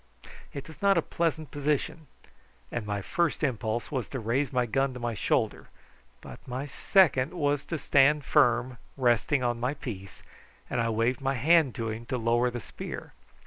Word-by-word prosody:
It 140 - -7
was 160 -3 -13
not 200 -2 +4
a - - +4
pleasant 160 -3 -2
position, 145 +2 -2 0.6
and 115 -3 -4
my 100 -1 -2
first 170 - 0
impulse 115 -4 -1
was 130 -5 -2
to 130 - -4
raise 120 +4 0
my 125 -1 +1
gun 135 +3 0
to - - -6
my 120 -1 -2
shoulder; - - -1 0.5
but - - -10
my 130 +3 -4
second 150 -1 +3
was 145 -3 0
to 165 - -3
stand 145 0 +3
firm, 120 +1 +3 0.2
resting 125 +2 +2
on 120 -1 0
my 125 +4 -1
piece, 100 -9 -8 0.5
and 120 - +1
I 115 - 0
waved 115 +3 0
my 135 0 0
hand 150 +1 +4
to 115 -1 -3
him 115 +2 -7
to 130 - -1
lower 120 +1 +2
the 120 0 -5
spear. - - -8
130 Hz, 180 wpm, -28 LUFS, 120-145 Hz, 0.6 s, not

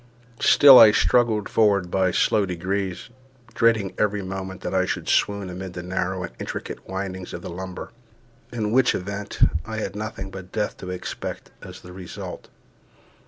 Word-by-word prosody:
Still 140 -3 +8
I 110 - +10
struggled 110 -4 +2
forward 100 -5 +2
by 95 -1 +2
slow 100 +2 +2
degrees, 95 +3 -3 0.4
dreading 115 -4 +2
every 105 -1 0
moment 95 0 -6
that - - -4
I 95 -1 +3
should - - -3
swoon 100 -1 +1
amid 90 0 -7
the 90 - -6
narrow 90 0 -2
and 85 - -6
intricate - - -6
windings 95 -1 -5
of 85 - -8
the - - -6
lumber, 95 +3 -7 0.6
in 110 -3 -2
which 130 +1 +3
event 100 +2 -5 0.3
I 110 +2 -6
had 110 - -4
nothing 105 -2 -6
but 95 -1 -10
death 105 -1 -2
to 90 - -8
expect 90 -1 -6
as - - -11
the 90 - -12
result. 90 -1 -8
95 Hz, 165 wpm, -23 LUFS, 90-105 Hz, 0.6 s, I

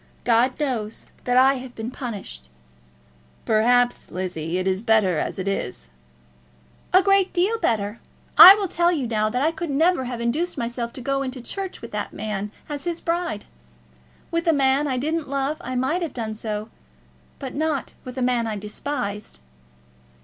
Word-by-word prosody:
God 245 +3 +2
knows 235 -7 -3
that 245 0 +2
I 265 +1 +5
have 250 -1 -10
been 225 +2 -5
punished." 200 - -7 1.0
"Perhaps, 245 +3 +2
Lizzie, 175 -2 -3
it 185 - -1
is 190 +1 0
better 215 -7 +3
as - - -3
it 190 0 -4
is." 125 - -3 1.0
"A 370 +1 +6
great 390 -1 +3
deal 400 +6 +1
better. 210 -1 -1 0.4
I 385 - +12
will 405 -2 -2
tell 345 0 +2
you 295 -7 -1
now 215 -2 0
that 250 +4 -1
I 315 - +3
could 330 0 -5
never 320 +3 +2
induce 250 +8 -2
myself 235 0 -3
to 260 - -8
go 275 +2 -1
into 260 -1 -4
church 380 +10 -5
with - - -8
that - - -4
man 210 -1 -4 0.2
as 290 0 -5
his 340 -1 -2
bride. 340 -9 -2 0.9
With 335 +1 -1
a 330 - +5
man 275 +1 +3
I 260 -2 -1
didn't 310 +3 -2
love 275 +2 -1
I 255 +1 -5
might 265 +8 0
have 330 -5 -4
done 220 -3 -3
so, 215 0 -4 0.7
but 265 -3 -6
not 310 -1 -2
with 255 0 -9
a 255 - 0
man 245 -2 +1
I 220 - -2
despised." 210 - -5
250 Hz, 170 wpm, -23 LUFS, 220-305 Hz, 1.0 s, I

